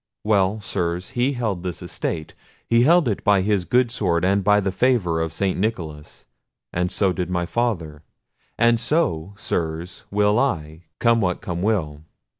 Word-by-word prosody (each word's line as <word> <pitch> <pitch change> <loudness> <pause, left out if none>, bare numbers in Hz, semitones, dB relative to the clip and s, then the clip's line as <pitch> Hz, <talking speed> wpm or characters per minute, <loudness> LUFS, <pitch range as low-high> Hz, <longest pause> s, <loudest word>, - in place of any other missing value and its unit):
Well, 105 -1 +2
Sirs, 90 -3 -2
he 130 +2 +1
held 110 -8 -2
this 90 -3 -5
estate; 80 -2 -4 0.3
he 115 0 +4
held 165 +3 +5
it 105 - -2
by 100 -2 +4
his 100 -2 +1
good 120 +6 +2
sword 90 -7 0
and 100 +1 +2
by 105 +1 +4
the 95 -1 -1
favour 95 -7 +1
of 80 -1 -2
St. 95 +3 -1
Nicholas—so 90 0 -3
did 90 0 -3
my 90 -1 -1
father; 85 -9 -2 0.6
and 120 0 +4
so, 100 - -1
Sirs, 85 -1 -3
will 105 +2 +2
I, 80 - -2
come 115 -1 +3
what 90 -2 0
come 85 -1 -4
will. 85 -8 -1
95 Hz, 155 wpm, -22 LUFS, 85-115 Hz, 0.6 s, held